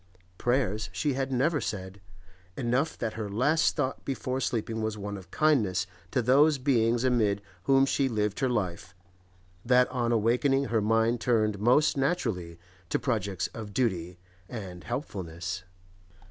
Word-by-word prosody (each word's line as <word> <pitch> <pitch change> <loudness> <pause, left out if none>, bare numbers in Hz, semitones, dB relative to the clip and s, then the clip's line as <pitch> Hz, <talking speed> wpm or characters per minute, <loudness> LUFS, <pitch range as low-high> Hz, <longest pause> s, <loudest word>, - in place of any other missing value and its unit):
Prayers 115 -4 0
she 145 -2 -1
had 135 0 -2
never 145 +4 +1
said; 95 -1 -5 0.6
enough 130 +5 0
that 115 -2 -3
her 110 -2 -4
last 145 +10 +2
thought 135 -4 -2
before 130 -1 -2
sleeping 115 -3 -2
was 110 -1 -2
one 100 0 -5
of 95 -2 -10
kindness 110 - +2 0.2
to 130 -3 0
those 140 +5 +5
beings 120 -3 +2
amid 110 -6 +2 0.3
whom 135 0 +5
she 135 0 +1
lived 105 -2 -1
her 135 -2 +1
life, 90 -6 -3 0.7
that 125 +1 +4
on 120 -2 -1
awaking 125 +5 +2
her 115 -4 +1
mind 115 +2 +2
turned 110 -4 +1
most 125 +8 +3
naturally 115 - -1 0.3
to - - +1
projects 100 -8 -1
of 105 -3 -8
duty 90 -8 -1 0.3
and 95 -7 -7
helpfulness. 90 - -5
115 Hz, 145 wpm, -28 LUFS, 100-130 Hz, 0.7 s, those